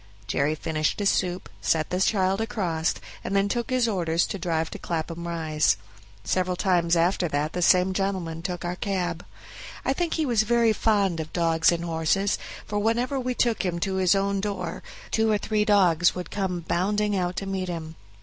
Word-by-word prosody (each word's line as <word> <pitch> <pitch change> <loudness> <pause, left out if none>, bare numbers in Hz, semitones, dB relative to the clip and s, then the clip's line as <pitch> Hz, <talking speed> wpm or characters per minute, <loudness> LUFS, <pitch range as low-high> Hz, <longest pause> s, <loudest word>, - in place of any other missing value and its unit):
Jerry 140 +8 0
finished 155 0 -1
his 205 -1 +3
soup, 180 0 -1
set 155 -2 +1
the 180 - 0
child 195 0 +2
across, 180 -9 -1 0.3
and 200 - -2
then 200 0 +3
took 235 +3 -2
his 255 -2 +2
orders 170 -5 +1
to 200 - -5
drive 165 -2 -1
to - - -7
Clapham 170 0 -4
Rise. 155 - +1 0.5
Several 185 -1 0
times 175 -2 +2
after 175 +2 +2
that 150 +1 -1
the 180 - -2
same 180 +1 +4
gentleman 185 -4 -2
took 180 0 -4
our 175 +1 -2
cab. 180 -3 -2 0.6
I 270 - +2
think 340 +3 -1
he 315 - 0
was 235 -5 +3
very 230 0 +3
fond 200 -6 +1
of 160 0 -5
dogs 165 -1 +3
and 170 0 -2
horses, 165 +5 +1 0.3
for 205 0 -2
whenever 240 +6 0
we 250 -1 -2
took 235 -3 +1
him 180 -2 -1
to 190 0 -1
his 185 +1 +4
own 195 0 0
door 195 -4 -4 0.3
two 220 0 +2
or 210 - +3
three 210 0 0
dogs 180 -5 +4
would 180 -1 -6
come 185 -3 -2
bounding 205 +5 0
out 180 -1 -1
to 195 - -3
meet 190 -1 -3
him. 160 -2 -5
185 Hz, 190 wpm, -25 LUFS, 170-205 Hz, 0.6 s, same